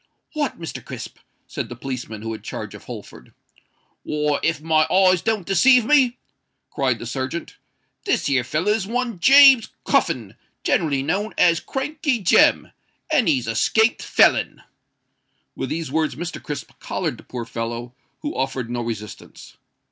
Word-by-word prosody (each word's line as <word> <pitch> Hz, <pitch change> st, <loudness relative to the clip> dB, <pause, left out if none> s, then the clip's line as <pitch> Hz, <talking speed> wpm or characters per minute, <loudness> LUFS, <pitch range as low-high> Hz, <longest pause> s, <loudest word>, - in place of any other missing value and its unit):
"What, 295 Hz, -5 st, -2 dB
Mr. 165 Hz, -, -7 dB
Crisp?" -, -, -9 dB, 0.3 s
said -, -, -5 dB
the 120 Hz, -, -7 dB
policeman, 120 Hz, -4 st, -6 dB
who 115 Hz, -, -4 dB
had 110 Hz, -, -7 dB
charge -, -, -6 dB
of -, -, -12 dB
Holford. -, -, -11 dB, 0.7 s
"Why! 150 Hz, -1 st, -1 dB
if 165 Hz, -1 st, 0 dB
my 155 Hz, 0 st, +2 dB
eyes 185 Hz, -2 st, +4 dB
doesn't 220 Hz, -5 st, -1 dB
deceive 250 Hz, +5 st, +5 dB
me," 260 Hz, -3 st, +3 dB, 0.5 s
cried 130 Hz, -4 st, 0 dB
the 115 Hz, -, -8 dB
serjeant, 130 Hz, +6 st, -5 dB, 0.5 s
"this -, -, 0 dB
here 135 Hz, -3 st, +2 dB
feller 155 Hz, -, 0 dB
is 210 Hz, -2 st, -1 dB
one 235 Hz, -3 st, -2 dB
James 270 Hz, 0 st, +7 dB, 0.2 s
Cuffin, -, -, 0 dB, 0.3 s
generally 145 Hz, -6 st, +1 dB
known 195 Hz, +9 st, -2 dB
as 170 Hz, -2 st, +4 dB
Crankey 285 Hz, -1 st, -2 dB
Jem—and 240 Hz, -, +1 dB
he's 135 Hz, -7 st, +2 dB
a 115 Hz, -, -2 dB
'scaped 220 Hz, -, +2 dB
felon." -, -, +2 dB, 0.9 s
With -, -, -4 dB
these 160 Hz, -4 st, -4 dB
words 155 Hz, -3 st, 0 dB
Mr. 175 Hz, +4 st, -6 dB
Crisp 150 Hz, -, -6 dB
collared -, -, -3 dB
the -, -, -14 dB
poor 120 Hz, -2 st, -6 dB
fellow, 115 Hz, +1 st, -5 dB, 0.3 s
who 295 Hz, -, -4 dB
offered 130 Hz, -3 st, -3 dB
no 120 Hz, 0 st, -2 dB
resistance. 110 Hz, -3 st, -8 dB
160 Hz, 150 wpm, -22 LUFS, -, 0.9 s, James